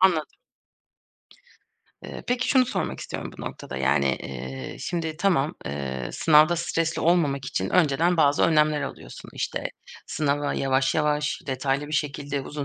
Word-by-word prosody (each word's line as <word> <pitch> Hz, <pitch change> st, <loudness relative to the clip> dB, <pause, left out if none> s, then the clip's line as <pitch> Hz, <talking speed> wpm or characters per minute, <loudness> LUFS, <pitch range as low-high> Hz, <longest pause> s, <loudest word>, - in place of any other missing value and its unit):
Anladım. 175 Hz, -5 st, +2 dB, 1.6 s
Eee, -, -, -7 dB
peki 245 Hz, -1 st, 0 dB
şunu 255 Hz, -3 st, +5 dB
sormak -, -, -3 dB
istiyorum -, -, -5 dB
bu -, -, -7 dB
noktada: -, -, -7 dB
Yani, 70 Hz, +1 st, +2 dB, 0.2 s
eee, 65 Hz, 0 st, -6 dB
şimdi, 165 Hz, -3 st, -3 dB
tamam, 165 Hz, -7 st, +1 dB
eee, 65 Hz, -3 st, -4 dB
sınavda 155 Hz, +2 st, +5 dB
stresli 165 Hz, -1 st, -1 dB
olmamak 150 Hz, -6 st, +2 dB
için 95 Hz, -7 st, -2 dB
önceden 170 Hz, +1 st, +3 dB
bazı 145 Hz, -2 st, +4 dB
önlemler 150 Hz, -2 st, +3 dB
alıyorsun. -, -, -8 dB
İşte, -, -, -3 dB, 0.4 s
sınava 145 Hz, -1 st, 0 dB
yavaş 135 Hz, 0 st, +1 dB
yavaş, 150 Hz, -1 st, +1 dB
detaylı 135 Hz, +2 st, -1 dB
bir 150 Hz, -, -9 dB
şekilde 145 Hz, -1 st, -1 dB
uzun 145 Hz, +1 st, -5 dB
150 Hz, 140 wpm, -25 LUFS, 135-165 Hz, 1.6 s, şunu